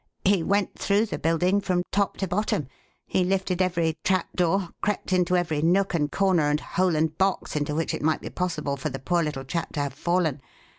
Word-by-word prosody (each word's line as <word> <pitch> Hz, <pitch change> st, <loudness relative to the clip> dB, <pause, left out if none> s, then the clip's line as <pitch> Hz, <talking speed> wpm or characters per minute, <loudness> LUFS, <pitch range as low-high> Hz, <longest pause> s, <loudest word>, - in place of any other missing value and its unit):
He 195 Hz, -2 st, +4 dB
went 200 Hz, +4 st, 0 dB
through 205 Hz, +2 st, +2 dB
the 215 Hz, -, -5 dB
building 180 Hz, +5 st, +2 dB
from 185 Hz, -2 st, 0 dB
top 200 Hz, 0 st, 0 dB
to 195 Hz, -, -2 dB
bottom; 180 Hz, -6 st, -1 dB, 0.4 s
he 185 Hz, -, +1 dB
lifted 185 Hz, 0 st, 0 dB
every 170 Hz, -3 st, 0 dB
trapdoor, 185 Hz, 0 st, +1 dB
crept 205 Hz, -2 st, -1 dB
into 180 Hz, 0 st, +2 dB
every 160 Hz, -4 st, 0 dB
nook 190 Hz, +4 st, +2 dB
and 150 Hz, -3 st, 0 dB
corner 185 Hz, -6 st, +2 dB
and 150 Hz, 0 st, +1 dB
hole 180 Hz, 0 st, 0 dB
and 155 Hz, 0 st, +1 dB
box 190 Hz, -4 st, 0 dB
into 150 Hz, 0 st, -1 dB
which 165 Hz, +1 st, -1 dB
it -, -, -3 dB
might 155 Hz, +1 st, +1 dB
be -, -, -7 dB
possible 150 Hz, -6 st, -2 dB
for 140 Hz, +3 st, -3 dB
the 135 Hz, -, -5 dB
poor 170 Hz, +6 st, 0 dB
little 150 Hz, -4 st, -3 dB
chap 165 Hz, +5 st, -3 dB
to 150 Hz, -, -3 dB
have 140 Hz, -2 st, -2 dB
fallen. 165 Hz, -2 st, 0 dB
175 Hz, 205 wpm, -25 LUFS, 155-190 Hz, 0.4 s, He